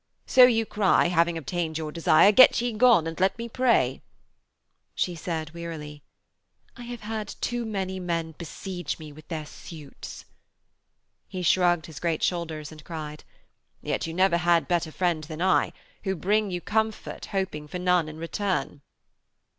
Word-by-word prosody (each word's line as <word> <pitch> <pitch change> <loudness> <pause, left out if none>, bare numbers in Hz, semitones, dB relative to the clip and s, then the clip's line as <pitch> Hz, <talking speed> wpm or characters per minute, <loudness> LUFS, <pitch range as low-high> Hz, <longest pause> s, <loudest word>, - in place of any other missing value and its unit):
So 255 -1 +8
you 225 -2 +2
cry, 200 -5 +3
having 170 -1 +2
obtained 160 +1 -3
your 155 -1 -4
desire, 165 +4 +5
"Get 255 +5 +7
ye 240 0 -1
gone, 225 -6 +5
and 165 +1 -5
let 190 +3 +2
me 235 0 -5
pray!"' 235 - +2 0.9
She 180 - 0
said 160 -2 -4
wearily: 155 -3 -7 0.7
'I 245 - -11
have 240 -1 -7
had 215 -1 -4
too 240 -1 -2
many 190 -3 -3
men 170 -2 -2
besiege 175 +3 -6
me 155 -2 -10
with 155 +1 -15
their 160 -3 -4
suits.' 150 -1 -10 1.0
He 185 -2 -5
shrugged 175 -2 +3
his 160 -3 -9
great 165 -2 -1
shoulders 160 -4 -2
and 155 -1 -12
cried: 155 -2 -7 0.6
'Yet - - -2
you 165 - -5
never 185 -1 +3
had 170 -1 +3 0.3
friend 175 -1 0
better 155 - -10
than 155 -1 -7
I, 185 - +3 0.3
who 190 -1 -1
bring 205 +4 +1
you 175 -1 -3
comfort 220 +2 -2
hoping 185 -6 -3
for 180 - -5
none 180 -3 +2
in 155 - -9
return.' 165 -3 -2
175 Hz, 160 wpm, -26 LUFS, 160-195 Hz, 1.0 s, So